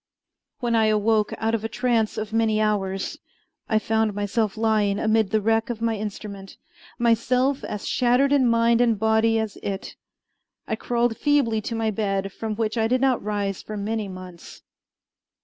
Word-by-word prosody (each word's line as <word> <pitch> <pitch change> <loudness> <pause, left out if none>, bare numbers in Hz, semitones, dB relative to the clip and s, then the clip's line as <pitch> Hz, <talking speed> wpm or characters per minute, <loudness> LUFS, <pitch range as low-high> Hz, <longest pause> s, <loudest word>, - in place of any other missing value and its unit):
When 240 -1 0
I 220 -1 +4
awoke 215 0 +2
out 225 +1 -1
of 225 -2 -1
a 225 - -2
trance 230 -2 0
of 215 0 -4
many 220 -1 +2
hours, 195 -3 -1 0.5
I 220 - +3
found 220 -1 0
myself 205 +1 -1
lying 215 -2 +2
amid 220 -1 +2
the 220 - +2
wreck 225 +2 +1
of 235 -2 -3
my 230 -1 0
instrument, 200 -2 -7 0.4
myself 250 +3 +1
as 210 - -5
shattered 255 +3 +2
in 265 -3 +4
mind 230 0 +3
and 230 -3 +3
body 220 +1 +2
as 220 -2 -3
it. 195 -1 -5 0.7
I 220 - -1
crawled 235 0 0
feebly 275 -7 +2
to 230 - -4
my 225 -1 0
bed, 195 -2 -2
from 220 -1 -4
which 220 +1 -1
I 220 - +2
did 255 +2 +1
not 265 -2 +2
rise 200 -2 -2
for 215 - -7
many 210 +1 -2
months. 185 -2 -11
220 Hz, 170 wpm, -24 LUFS, 210-230 Hz, 0.7 s, I